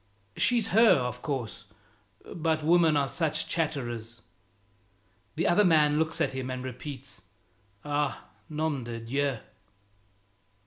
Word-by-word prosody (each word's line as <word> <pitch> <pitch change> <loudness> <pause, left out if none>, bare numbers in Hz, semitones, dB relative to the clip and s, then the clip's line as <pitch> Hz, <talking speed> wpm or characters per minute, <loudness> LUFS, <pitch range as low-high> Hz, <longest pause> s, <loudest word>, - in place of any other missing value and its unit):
She's 235 -3 +2
her, 225 +2 +6
of 125 -2 -3
course, 130 -9 -4 0.7
but 160 -2 0
women 165 -1 +4
are 140 -1 +1
such 160 +1 -1
chatterers!" 120 -8 -3 1.1
The 165 - 0
other 175 +4 +5
man 150 -4 +4
looks 160 +1 -1
at 160 - +1
him, 130 -1 -4
and 130 0 -4
repeats, 130 +1 -8 0.6
"Ah, 145 -1 -1 0.2
nome 155 -3 -2
de 115 0 -6
Dieu!" 135 +3 -1
145 Hz, 120 wpm, -28 LUFS, 125-160 Hz, 1.1 s, her